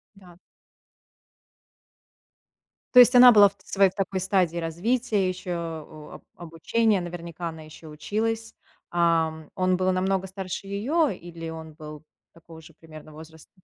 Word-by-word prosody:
Да. 180 -3 -18 2.6
То 250 - +10
есть 250 +1 +6
она 245 0 +9
была 205 -2 +7
в - - -25
своей 195 -1 +2
такой 190 0 -3
стадии 185 -3 0
развития 195 +5 -1
ещё, 185 0 -5
а, 160 -2 -8
об - - -13
обучения. 190 +6 -1
Наверняка 170 -1 -7
она 160 -1 -10
ещё 155 +1 -13
и 150 - -11
училась. 225 +7 -3 0.4
Ам, 165 -2 0
он 185 -1 +1
был 185 0 0
намного 190 +1 -1
старше 190 0 -7
её 270 +12 0
или 170 -2 -8
он 160 -1 -10
был 150 -1 -11 0.3
такого 165 -1 -15
же 165 - -16
примерно 155 -1 -14
возраста? 160 +1 -14
175 Hz, 140 wpm, -25 LUFS, 160-195 Hz, 2.6 s, То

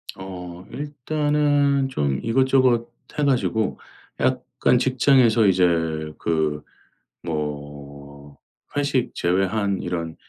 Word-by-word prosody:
어 90 -2 -8
일단은 145 -1 0
좀 70 - -1
이것저것 130 -1 +3 0.3
해 - - +2
가지고 120 -6 0 0.4
약간 - - +1
직장에서 125 -4 +4
이제 95 -1 +4 0.5
그 80 -2 -1 0.6
뭐 70 -2 -7 0.4
회식 140 -3 0
제외한 95 +2 0
이런 85 -2 -4
100 Hz, 175 characters per minute, -23 LUFS, 80-135 Hz, 0.6 s, 직장에서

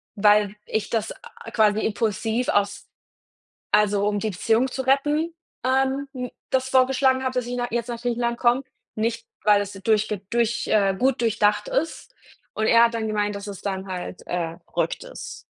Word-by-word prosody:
weil 210 0 +4
ich 220 - -2
das 220 -2 -1
a 230 - -13
quasi 215 -1 +3
impulsiv 220 +2 -1
aus 205 0 0 0.9
also, 205 -1 +3
um 205 0 0
die 220 - -1
Beziehung 225 +6 +1
zu 265 - -3
retten, 295 +5 +1 0.3
ähm, 265 +2 +1
n 250 -1 -4 0.2
das 260 0 +1
vorgeschlagen 260 0 +3
habe, 260 0 -1
dass 250 -2 -1
ich 245 0 -3
nach 245 0 -2
jetzt 235 +1 -2
nach 235 -1 -4
Griechenland 235 0 -1
komme, 245 +2 +3 0.3
nicht, 230 +1 -2 0.2
weil 205 -1 +5
es 205 0 -4
durchge 210 +1 +1
durch, 235 0 +1
äh, 200 -2 +3
gut 260 0 +2
durchdacht 220 - +2
ist. - - -2 0.4
Und 220 - 0
er 230 0 +7
hat 235 0 +1
dann 225 -1 -1
gemeint, 210 -1 -1
dass 200 0 -7
es 200 -2 -7
dann 190 -1 -3
halt, 185 -1 -6
äh, 165 -2 -2 0.2
„verrückt - - -1
ist“. - - -8
230 Hz, 180 wpm, -24 LUFS, 205-255 Hz, 0.9 s, er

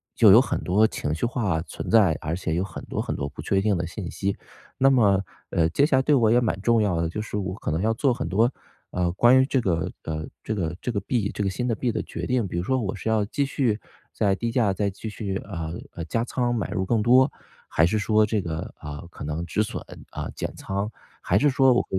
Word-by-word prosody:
就 110 -4 +7
有 110 - +9
很 - - -2
多 105 +5 +3
情 75 -7 -3
绪 85 - -1
化 105 -9 0
存 80 - -7
在， 100 -9 +5
而 80 +2 -2
且 80 -3 -3
有 90 - +1
很 95 - -7
多 - - -3
很 - - -3
多 70 - -3
不 75 - -9
确 95 +5 +1
定 105 0 +2
的 85 -1 -2
信 90 0 -6
息， 100 0 -2 0.4
那 135 +1 +5
么， 100 -7 +4 0.3
呃， 80 -1 +3
接 140 - +3
下 135 - +3
来 130 - +4
对 150 - +3
我 115 -4 +4
也 120 - +5
蛮 105 -6 -1
重 115 +2 +3
要 90 -5 +1
的， 80 - 0
就 105 - -4
是 105 -1 -4
我 95 -2 -3
可 100 - -4
能 80 +3 0
要 110 - +2
做 130 +2 +2
很 130 +2 -4
多， 115 +7 +3 0.4
呃， 90 -1 0
关 120 +6 +6
于 130 - +3
这 135 - +1
个 85 -6 0
呃， 80 -1 -4 0.2
这 110 - -2
个 85 -4 -2
这 125 - -2
个 105 - -1
币， 110 -5 -1
这 100 - -2
个 95 - +1
新 125 +6 -2
的 115 - +1
币 120 +3 -1
的 110 - -2
决 - - -5
定， 125 -5 +1
比 85 - -6
如 85 - -1
说 130 +5 +1
我 100 -4 -2
是 110 - -4
要 110 -2 +2
继 140 +7 -1
续 120 -6 0 0.3
在 100 -2 +2
低 115 +1 -2
价 115 -5 +2
再 100 +1 -1
继 110 +3 -7
续， 100 -2 -3
呃 85 -4 -5 0.2
呃， 85 - -5
加 115 +7 -1
仓 120 -1 0
买 110 -5 -2
入 95 -3 -1
更 110 +1 +1
多， 130 +4 +5 0.4
还 80 - +3
是 110 - 0
说 110 +1 +3
这 105 -1 0
个， 80 -2 -4
啊， 75 -1 -7
可 - - -10
能 75 +3 -3
止 105 +6 +1
损， - - -5 0.3
啊， - - -5
减 - - -4
仓， 100 +2 -3 0.3
还 100 - +2
是 145 - +4
说 130 -1 +5
我 - - +1
105 Hz, 280 characters per minute, -25 LUFS, 90-120 Hz, 0.4 s, 有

